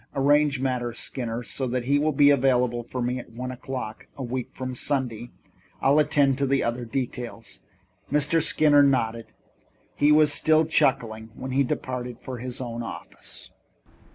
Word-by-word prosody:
Arrange 145 0 +3
matters, 125 -3 -2
Skinner, 120 -2 -4
so 130 +2 -3
that 125 0 -1
he 140 +3 +2
will 155 +1 +2
be 145 0 +5
available 125 -3 +2
for 125 +1 -4
me 125 +1 -1
at 120 - -10
one 125 +2 -5
o'clock, 125 -3 -6
a 135 - -4
week 125 0 -4
from 130 -1 -5
Sunday. 120 -3 -2 0.5
I'll 140 +3 +4
attend 140 -2 +3
to 140 - +1
the 135 +1 +2
other 120 +1 -2
details." 120 -2 -5 0.5
Mr. 150 +3 +3
Skinner 150 -2 +4
nodded. 115 -5 +1 0.7
He 145 - +4
was 150 -1 +5
still 155 +2 +3
chuckling 110 -7 +1
when 130 +1 -6
he 135 +2 +3
departed 125 -2 -4
for 130 -1 -7
his 125 +1 -6
own 120 -2 -4
office. 115 - -8
130 Hz, 160 wpm, -25 LUFS, 120-140 Hz, 0.7 s, be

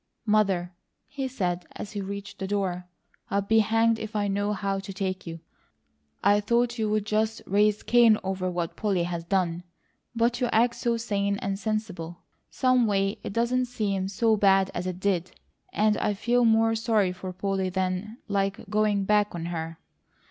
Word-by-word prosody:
"Mother," 195 -5 +2 0.3
he 270 -1 -4
said 180 -9 -2
as 205 - -7
he 205 -1 -4
reached 200 +1 -7
the 190 - -3
door, 185 -3 -2 0.4
"I 200 - +1
be 220 +3 +3
hanged 225 +1 +3
if 220 0 -7
I 205 -1 +1
know 205 +1 0
how 195 -1 -1
to 195 0 -7
take 190 -1 -3
you! 165 -1 -7 0.8
I 205 +1 +5
thought 235 +3 +1
you'd 215 -1 0
just 215 +1 0
raise 210 +2 +2
Cain 235 -3 +5
over 190 -1 -2
what 175 -2 -3
Polly 195 -5 0
has 170 -1 -3
done; 175 -1 0 0.5
but 235 +1 +1
you 250 - +2
act 235 +1 +3
so 235 -1 0
sane 200 -3 -1
and 195 0 -3
sensible; 195 -7 -4 0.3
someway 220 -6 +2
it - - -5
doesn't 240 +4 +1
seem 200 -6 -2
so 220 +3 +2
bad 195 -2 +3
as 180 +1 -3
it 180 -1 -4
did, 185 -3 -1 0.4
and 215 0 +2
I 205 - 0
feel 240 +4 +2
more 225 0 +4
sorry 220 -4 +1
for 185 0 -6
Polly 190 0 -1
than 190 +4 -2
like 200 +1 -1
going 210 -2 +2
back 210 -1 +2
on 165 -1 -4
her. 165 0 -4
200 Hz, 170 wpm, -26 LUFS, 190-220 Hz, 0.8 s, I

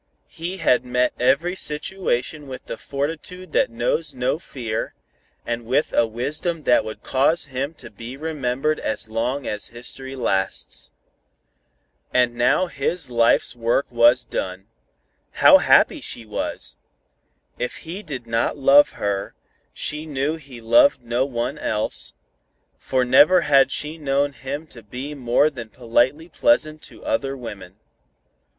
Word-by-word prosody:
He 175 +4 -5
had 125 -8 +3
met 125 0 +1
every 140 +9 +2
situation 150 -4 -2
with 130 -1 -8
the - - -5
fortitude 165 +5 -5
that - - +2
knows 135 +6 -1
no 125 +5 0
fear, 115 -9 -4 0.5
and 120 0 -3
with 130 +6 0
a 115 - +3
wisdom 150 +8 -3
that 125 - +4
would 110 - -8
cause 145 +5 +2
him 140 +3 -4
to - - -11
be 115 +5 -9
remembered 150 -1 -1
as 110 0 -2
long 120 +5 -2
as 105 0 -2
history 130 +3 -6
lasts. 95 -7 -2 1.2
And 125 -1 +3
now 120 +9 +3
his 165 -2 -3
life's 115 +1 +3
work 120 +3 +1
was 120 +1 +5
done. 95 +1 -4 0.7
How - - +7
happy - - +4
she 115 - -4
was! 105 - -4 0.8
If 125 - -3
he 175 +5 -6
did 135 - -6
not 115 +4 0
love 140 +1 +6
her, 100 -1 -3 0.4
she 150 +1 -3
knew 145 +1 -1
he 135 -6 -12
loved 280 - +4
no 120 +2 0
one 120 -2 -3
else, 105 0 -3 0.7
for 130 -1 0
never 150 +8 +6
had 135 -4 +5
she 150 +4 -3
known 140 0 0
him 140 +4 -6
to 125 -6 -12
be 125 +7 -7
more 140 +2 +2
than 120 -5 -8
politely 125 +7 +1
pleasant 155 - +2
to - - -15
other 135 0 -1
women. 100 -6 -9
130 Hz, 140 wpm, -22 LUFS, 120-150 Hz, 1.2 s, How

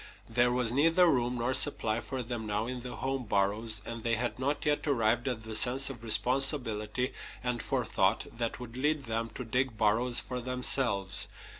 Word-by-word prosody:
There 120 +1 +1
was 125 -2 +1
neither 165 +7 +3
room 125 -6 +1
nor 120 +2 -1
supply 110 -4 +2
for 130 -2 -5
them 115 -2 -5
now 105 +1 -2
in 125 0 -5
the 125 0 -7
home 135 0 -3
burrows, 105 +1 0
and 115 0 -7
they 115 0 0
had 120 +2 -3
not 140 +3 -2
yet 150 +1 0
arrived 120 -2 +1
at 120 -4 -3
the 110 0 -6
sense 135 +4 +4
of 120 -4 -12
responsibility 125 -1 +2 0.3
and 125 -2 -2
forethought - - 0
that 115 -1 -4
would 120 -1 -9
lead 150 +3 -1
them 115 -1 -3
to 125 - -6
dig 125 0 -2
burrows 115 +3 +3
for 125 -1 -5
themselves. 125 -5 +2
120 Hz, 180 wpm, -29 LUFS, 115-130 Hz, 0.3 s, sense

